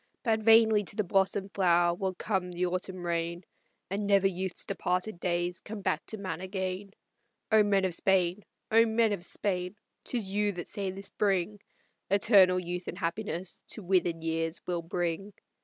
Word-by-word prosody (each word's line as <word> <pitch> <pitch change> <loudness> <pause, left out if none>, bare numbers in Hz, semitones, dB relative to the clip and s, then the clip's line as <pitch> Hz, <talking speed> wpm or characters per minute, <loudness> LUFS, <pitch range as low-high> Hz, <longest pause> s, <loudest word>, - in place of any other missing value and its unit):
But 225 -3 +2
vainly 220 -1 +6
to 195 - -7
the 210 - +1
blossomed 195 +1 +1
flower 175 -2 +3
will 185 +1 -3
come 190 -2 -1
the 180 +1 -1
autumn 185 0 -3
rain, 170 +1 -2 0.4
And 200 +2 -2
never 200 -1 +4
youth's 190 -1 -1
departed 185 0 -2
days 175 0 -1
come 215 -1 -7
back 155 -4 0
to 220 - -4
man 185 -4 -5
again. 190 +1 -3 0.6
O 220 0 +7
men 200 -2 +3
of 185 - +1
Spain! 185 +1 +2 0.3
O 225 +1 +7
men 225 -1 +2
of 185 -4 -4
Spain! 180 0 -2 0.3
'Tis 235 -6 -3
you 205 0 +1
that 175 -2 -6
say 200 -2 -3
the 195 +1 -7
spring 200 0 0 0.5
Eternal 195 -2 +5
youth 180 0 -5
and 180 - -5
happiness 180 0 -4
to 215 - -6
withered 175 -3 +1
years 165 +1 -1
will 175 -1 -2
bring!" 175 +3 -3
190 Hz, 170 wpm, -29 LUFS, 175-205 Hz, 0.6 s, O